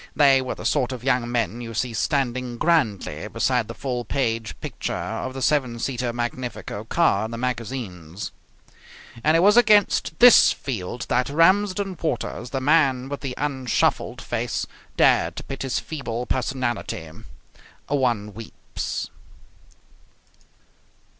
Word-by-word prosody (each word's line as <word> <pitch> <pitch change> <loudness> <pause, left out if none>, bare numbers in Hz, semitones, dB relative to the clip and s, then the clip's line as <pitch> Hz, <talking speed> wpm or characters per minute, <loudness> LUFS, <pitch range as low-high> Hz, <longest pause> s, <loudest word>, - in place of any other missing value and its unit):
They 135 -3 +5
were 130 - -4
the - - -9
sort 135 -4 +1
of 125 -2 -6
young 125 -3 +1
men 120 -1 -1
you 115 -1 -7
see 120 +2 -1
standing 125 -1 -1
grandly 105 - 0
beside 115 +1 0
the 115 - -7
full 125 -1 -3
page 115 -4 -2
picture - - -4
of 130 0 -4
the 135 - -3
seven 135 -6 +1
seater 125 0 -2
Magnifico 120 -3 -4
car 110 -7 +2
in - - -5
the 115 - -5
magazines. 115 -8 -4 0.9
And 155 +2 +4
it - - +3
was 205 +4 +5
against 210 -8 +4
this 245 -1 +8
field 120 -2 -5
that 125 +2 +1
Ramsden 185 +3 +2
Waters, 125 -4 -3
the 135 - -2
man 135 -2 +2
with 145 - -4
the 130 -3 -4
unshuffled 135 -4 0
face, - - -2 0.3
dared - - +4
to - - -6
pit 135 - -7
his 130 -5 -1
feeble 125 -6 -4
personality. 125 -9 -2 0.8
One 120 -7 0
weeps. 115 +2 -6
125 Hz, 135 wpm, -23 LUFS, 115-140 Hz, 0.9 s, this